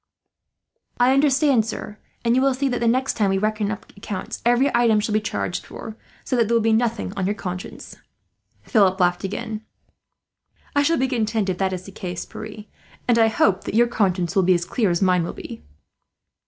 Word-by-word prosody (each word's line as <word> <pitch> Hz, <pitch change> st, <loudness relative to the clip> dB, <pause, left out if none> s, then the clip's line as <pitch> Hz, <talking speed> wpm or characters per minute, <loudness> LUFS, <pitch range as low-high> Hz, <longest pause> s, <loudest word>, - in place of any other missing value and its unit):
"I 250 Hz, +2 st, +5 dB
understand, 275 Hz, -3 st, +3 dB
sir, 215 Hz, -1 st, -7 dB, 0.3 s
and 230 Hz, +1 st, +3 dB
you 260 Hz, -, +3 dB
will 270 Hz, -1 st, +2 dB
see 275 Hz, +1 st, 0 dB
that 245 Hz, -, -1 dB
the 235 Hz, -, +1 dB
next 255 Hz, +3 st, +2 dB
time 205 Hz, -3 st, +1 dB
we 195 Hz, -, +1 dB
reckon 215 Hz, 0 st, 0 dB
up 205 Hz, -2 st, -7 dB
accounts 200 Hz, -1 st, -6 dB
every 245 Hz, +4 st, +3 dB
item 230 Hz, -3 st, +4 dB
shall 210 Hz, 0 st, -2 dB
be 215 Hz, -, +2 dB
charged 205 Hz, -3 st, -3 dB
for, 220 Hz, -, -9 dB, 0.3 s
so -, -, -2 dB
that 235 Hz, -3 st, +2 dB
there 235 Hz, -, +1 dB
will 230 Hz, -, +3 dB
be 225 Hz, 0 st, +3 dB
nothing 230 Hz, -3 st, 0 dB
on 190 Hz, -2 st, -1 dB
your 205 Hz, -, 0 dB
conscience." 180 Hz, -2 st, -7 dB, 0.7 s
Philip 195 Hz, -5 st, +3 dB
laughed 180 Hz, 0 st, +2 dB
again. 215 Hz, +2 st, -4 dB, 1.1 s
"I 285 Hz, -, +4 dB
shall 330 Hz, +3 st, +2 dB
be 265 Hz, -, +1 dB
content 220 Hz, -5 st, -1 dB
if 180 Hz, -, -2 dB
that 190 Hz, -1 st, +1 dB
is 185 Hz, -1 st, -4 dB
the 195 Hz, -, -11 dB
case, 180 Hz, -2 st, -5 dB
Pierre; 215 Hz, -1 st, -9 dB, 0.4 s
and 235 Hz, -1 st, +4 dB
I 225 Hz, -, +6 dB
hope 200 Hz, -3 st, +1 dB
that -, -, -4 dB
your 240 Hz, +1 st, +6 dB
conscience 185 Hz, -7 st, 0 dB
will 195 Hz, -, +5 dB
be 185 Hz, 0 st, +4 dB
as 175 Hz, 0 st, -1 dB
clear 210 Hz, +3 st, 0 dB
as 175 Hz, +2 st, +1 dB
mine 180 Hz, -2 st, +3 dB
will 170 Hz, -, -4 dB
be." 115 Hz, -, -9 dB
215 Hz, 210 wpm, -22 LUFS, 190-240 Hz, 1.1 s, I